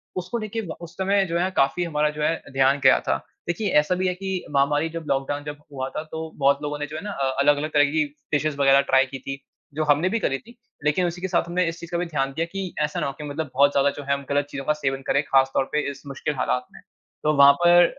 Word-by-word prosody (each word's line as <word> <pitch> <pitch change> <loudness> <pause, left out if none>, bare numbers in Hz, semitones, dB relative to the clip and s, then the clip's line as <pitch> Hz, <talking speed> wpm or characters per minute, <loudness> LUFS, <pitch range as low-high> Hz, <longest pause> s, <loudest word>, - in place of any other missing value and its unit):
उसको 185 +5 -3
लेके 220 0 -4
व 160 - -5
उस 170 0 -9
समय 195 +1 +2
जो 170 +1 0
है, 180 +2 +1
काफ़ी 135 +5 +2
हमारा 150 -3 +1
जो 150 0 -6
है, 165 - +2 0.2
ध्यान 135 +1 +3
गया - - +6
था। - - +2 0.3
देखिए, 185 +5 -1
ऐसा 150 +5 0
भी 185 +1 0
है 180 - +1
कि 190 -1 -3
महामारी 145 +3 +2
जब 165 0 -6
लॉकडाउन 140 +2 -1
जब 145 0 -6
हुआ 130 -1 -4
था, 155 - -5
तो 160 0 -7
बहुत 140 0 +3
लोगों 145 0 -3
ने 145 - -2
जो 150 - -8
है - - -5
ना 205 - -4
अ, 135 -7 -1
अलग-अलग 145 +2 +2
तरह 145 -1 +6
की 155 0 +2 0.3
डिशेज़ 150 0 +1
वग़ैरह 140 0 +5
ट्राय 135 0 +5
की 135 0 -8
थी, 135 +1 -6 0.3
जो 155 +2 -1
हमने 150 +5 +3
भी 230 - 0
करी 135 -10 0
थी, 235 +2 -18 0.3
लेकिन 150 +5 +2
उसी 175 +1 -5
के 190 - -1
साथ 175 -2 0
हमने 180 +1 +1
इस 165 0 -7
चीज़ 170 - -10
का 170 - 0
भी 175 - -1
ध्यान 135 -5 -1
दिया 160 +4 -1
कि 195 -2 -4
ऐसा 150 - -2
ना - - -1
हो 140 - -4
कि - - -7
मतलब 145 -1 -4
बहुत 140 +2 +5
ज़्यादा 140 0 +3
जो 145 - -6
है, 140 0 0
हम 140 0 -4
गलत 145 0 +1
चीज़ों 135 -1 -6
का 150 - +3
सेवन 135 -3 -2
करें, 140 - +3
ख़ास 135 -1 +3
तौर 135 - +2
पे 150 - +1
इस 140 - -12
मुश्किल 140 +2 -3
हालात 125 -1 -1
में। - - -13 0.4
तो 150 - +3
वहाँ 140 0 +9
पर 175 +3 +6
150 Hz, 275 wpm, -24 LUFS, 140-175 Hz, 0.4 s, वहाँ